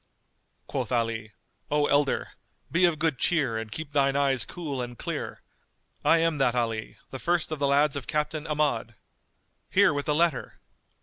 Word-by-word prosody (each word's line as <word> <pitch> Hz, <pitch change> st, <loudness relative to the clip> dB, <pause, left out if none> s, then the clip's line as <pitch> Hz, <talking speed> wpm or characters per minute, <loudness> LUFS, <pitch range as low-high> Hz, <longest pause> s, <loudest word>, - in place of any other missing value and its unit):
Quoth -, -, -3 dB
Ali, 115 Hz, -2 st, -1 dB, 0.4 s
"O 150 Hz, 0 st, +2 dB
elder, 145 Hz, -1 st, +1 dB, 0.4 s
be 175 Hz, +2 st, +4 dB
of 170 Hz, -3 st, +2 dB
good 155 Hz, -4 st, 0 dB
cheer 140 Hz, -10 st, +2 dB
and 110 Hz, -1 st, -7 dB
keep 155 Hz, +5 st, -6 dB
thine 140 Hz, -1 st, +2 dB
eyes 135 Hz, -4 st, +1 dB
cool 145 Hz, -7 st, -4 dB
and 120 Hz, -1 st, -6 dB
clear: -, -, -5 dB, 0.6 s
I 165 Hz, -, +5 dB
am 165 Hz, -2 st, +1 dB
that 125 Hz, -3 st, +2 dB
Ali, 115 Hz, -2 st, -2 dB
the 135 Hz, -, -6 dB
first 170 Hz, 0 st, 0 dB
of 155 Hz, -, -3 dB
the 140 Hz, -, +2 dB
lads 145 Hz, +1 st, +3 dB
of 140 Hz, -, -5 dB
Captain 150 Hz, +1 st, -2 dB
Ahmad: 145 Hz, -7 st, 0 dB, 0.7 s
here 195 Hz, -4 st, +5 dB
with 145 Hz, 0 st, -3 dB
the 150 Hz, -, +2 dB
letter!" 165 Hz, -4 st, 0 dB
145 Hz, 170 wpm, -27 LUFS, 125-155 Hz, 0.7 s, I